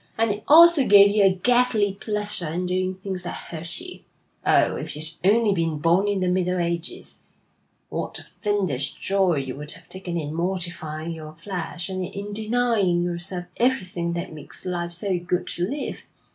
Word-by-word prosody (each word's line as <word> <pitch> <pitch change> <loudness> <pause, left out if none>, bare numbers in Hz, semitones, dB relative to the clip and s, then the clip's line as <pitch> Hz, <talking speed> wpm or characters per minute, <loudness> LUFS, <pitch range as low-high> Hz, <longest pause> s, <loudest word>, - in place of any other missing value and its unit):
'And 225 -1 +2
it 210 +1 -4
also 335 -1 +8
gave 200 -3 +7
you 210 - +5
a 195 - +7
ghastly 215 +1 +2
pleasure 210 -3 -2
in 175 +4 -2
doing 185 +1 -1
things 190 -1 -5
that 175 - -5
hurt 165 0 -2
you. 360 +1 -9 0.4
Oh, - - +3
if - - -5
you'd 155 +1 0
only 210 +2 +4
been 165 -4 -1
born 170 +6 +2
in 200 -2 0
the 185 - +1
Middle 180 0 +1
Ages, 170 0 -3 0.7
what - - -3
a - - -9 0.2
fiendish 185 - 0
joy 190 -3 +1
you 135 -2 -3
would 150 +1 -1
have 165 0 -13
taken 185 -2 -5
in 150 -2 -4
mortifying 170 -2 -3
your 155 -1 -9
flesh, 175 0 -5
and 185 -1 -3
in 200 +3 -6
denying 215 -5 +1
yourself 175 +1 -3
everything 185 -9 0
that 170 0 -4
makes 150 -2 -8
life 175 -1 -3
so 180 +1 -1
good 175 +1 -2
to 175 +1 -2
live! 285 +6 -4
185 Hz, 175 wpm, -24 LUFS, 170-205 Hz, 0.7 s, also